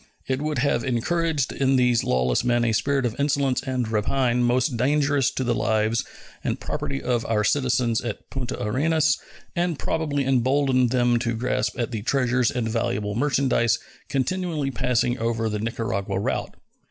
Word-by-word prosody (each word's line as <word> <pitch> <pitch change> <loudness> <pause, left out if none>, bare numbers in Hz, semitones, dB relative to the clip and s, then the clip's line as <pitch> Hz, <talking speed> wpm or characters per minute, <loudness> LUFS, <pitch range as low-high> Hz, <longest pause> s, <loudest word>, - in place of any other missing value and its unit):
It 130 +1 -1
would 150 0 -2
have 125 -2 +1
encouraged 145 +4 0
in 135 0 +2
these 125 -2 +3
lawless 65 - +1
men 120 -1 +2
a 115 - +2
spirit 135 +4 +1
of 115 - -1
insolence 140 -2 +1
and 130 -3 -2
rapine 120 +3 +1
most 125 +2 +2
dangerous 140 +2 +2
to 130 - -3
the 120 - +1
lives 110 +1 +1 0.4
and - - -2
property 135 - -3
of 120 -2 0
our 105 -2 +1
citizens 125 -2 +1
at 115 -3 -6
Punta 130 -3 -4
Arenas, 155 +8 +2 0.4
and 175 -2 0
probably 145 -4 -1
emboldened 130 0 +2
them 120 -1 +2
to 115 -1 -1
grasp 125 +3 -1
at 120 - -1
the 110 -3 -3
treasures 125 0 +1
and 120 -3 -2
valuable 105 -2 -1
merchandise 130 -2 +2 0.3
continually 150 0 -1
passing 125 0 0
over 115 0 0
the 105 0 -2
Nicaragua 105 -3 -2
route. - - -2
125 Hz, 160 wpm, -24 LUFS, 115-140 Hz, 0.4 s, these